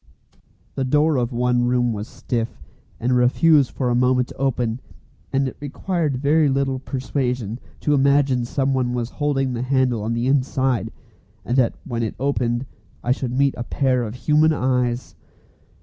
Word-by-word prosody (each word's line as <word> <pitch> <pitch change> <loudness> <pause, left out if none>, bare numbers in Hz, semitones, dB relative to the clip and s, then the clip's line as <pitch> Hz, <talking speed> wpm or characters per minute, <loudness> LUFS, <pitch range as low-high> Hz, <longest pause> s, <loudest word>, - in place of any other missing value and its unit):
The 135 - -2
door 150 +4 +2
of 120 0 0
one 125 0 +1
room 120 -1 +1
was 105 +1 -5
stiff, 120 -2 -4 0.4
and 125 +2 +1
refused 135 +3 +4
for 130 - -2
a - - +2
moment 125 +1 +2
to - - -11
open, 125 -3 -1 0.5
and 135 0 +1
it 130 - -7
required 150 0 -2
very 150 +3 +3
little 135 -1 0
persuasion 125 -4 -3 0.2
to 150 - +1
imagine 140 -2 +3
someone 130 -1 0
was 120 -1 -3
holding 135 -3 0
the 120 - -3
handle 130 -3 +1
on 110 +2 -2
the 120 +1 -1
inside, 130 -3 +1 0.5
and 120 - -1
that 125 -3 +3
when 120 -2 -3
it 110 - -2
opened 125 -2 0 0.4
I 125 - 0
should 130 -1 -1
meet 140 0 +3
a 120 - -4
pair 130 0 +1
of 115 -1 -4
human 155 +4 +3
eyes. 125 -3 -1
130 Hz, 165 wpm, -22 LUFS, 120-140 Hz, 0.5 s, refused